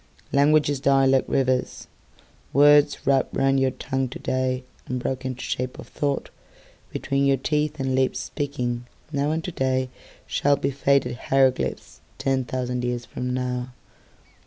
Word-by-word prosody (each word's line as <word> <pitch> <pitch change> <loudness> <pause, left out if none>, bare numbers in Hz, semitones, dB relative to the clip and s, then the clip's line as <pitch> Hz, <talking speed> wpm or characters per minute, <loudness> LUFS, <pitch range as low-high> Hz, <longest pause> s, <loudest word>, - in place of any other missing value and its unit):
Languages 145 0 +3
die 135 0 +4
like 135 0 +3
rivers. 130 -1 0 0.7
Words 145 +1 +5
wrapped 135 -1 +2
round 135 0 +3
your 135 0 +3
tongue 130 0 -2
todayAnd 130 0 -2 0.3
broken 130 +1 -3
to 130 - -8
shape 125 0 -3
of - - -12
thoughtBetween 140 - -3
your 135 -1 +3
teeth 150 +2 -1
and 135 -1 -1
lips 130 0 0
speakingNow 140 +1 -3
and 160 +1 -1
todayShall 130 -1 -1
be 140 - 0
faded 135 -2 +1
hieroglyphicsTen 130 0 0
thousand 125 -1 -2
years 120 0 -2
from 125 0 -4
now. 125 0 -2
135 Hz, 120 wpm, -24 LUFS, 125-140 Hz, 0.7 s, Words